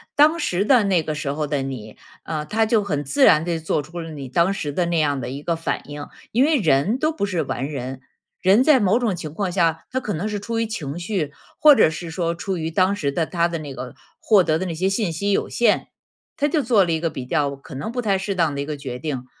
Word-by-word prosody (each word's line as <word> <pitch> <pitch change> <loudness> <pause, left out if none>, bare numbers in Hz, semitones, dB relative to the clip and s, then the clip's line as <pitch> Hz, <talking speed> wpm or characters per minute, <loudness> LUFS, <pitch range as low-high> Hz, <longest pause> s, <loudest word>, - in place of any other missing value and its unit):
当 310 +3 +5
时 190 - 0
的 250 -2 +5
那 185 -5 +2
个 155 - -3
时 150 -2 -3
候 150 +1 -2
的 145 -1 -1
你， 125 -6 -6 0.3
呃， 155 -2 -3
他 220 +9 +1
就 220 -1 +2
很 145 -7 -2
自 270 - +1
然 155 -9 +6
地 170 -2 -1
做 155 -2 -1
出 170 +5 -8
了 165 -1 -6
你 145 -4 -7
当 170 +8 +2
时 175 -7 -3
的 175 +3 0
那 170 0 0
样 145 -3 +1
的 120 - -4
一 140 +3 -6
个 170 - 0
反 165 - -3
应。 145 0 -6 0.2
因 245 +4 +3
为 305 +1 +3
人 170 - +2
都 310 +4 +1
不 315 - -5
是 175 -5 -1
完 135 -1 -3
人， 130 -2 -5 0.4
人 195 +7 +5
在 295 -2 +5
某 205 +1 +3
种 230 -6 0
情 155 -3 -6
况 185 +3 -2
下， 165 -3 +1
他 260 - 0
可 235 - -4
能 175 +7 -2
是 210 -1 -3
出 225 +3 -3
于 230 - +1
情 165 -10 -5
绪， 175 -4 -2 0.3
或 300 -1 +8
者 160 - +5
是 165 +2 -6
说 165 0 -1
出 185 +2 -3
于 160 0 -3
当 185 +4 +2
时 140 -8 -1
的 160 +3 -1
他 170 -1 +1
的 170 -1 -4
那 145 -3 -7
个 125 -2 -7 0.3
获 205 -4 +4
得 155 -2 +1
的 185 - -3
那 175 - -3
些 185 +4 0
信 195 -3 -1
息 200 +6 -2
有 - - +1
限， 240 - +1 0.5
他 290 - +1
就 300 -1 +1
做 225 -5 +4
了 175 - -1
一 160 - +1
个 165 0 -1
比 130 -4 -6
较 145 -2 0
可 135 0 -12
能 140 +11 -4
不 245 +1 -2
太 200 -4 +1
适 190 +1 -2
当 165 -6 +1
的 - - -4
一 140 - -2
个 150 0 -4
决 135 -3 -6
定。 135 -3 -4
170 Hz, 290 characters per minute, -22 LUFS, 150-205 Hz, 0.5 s, 或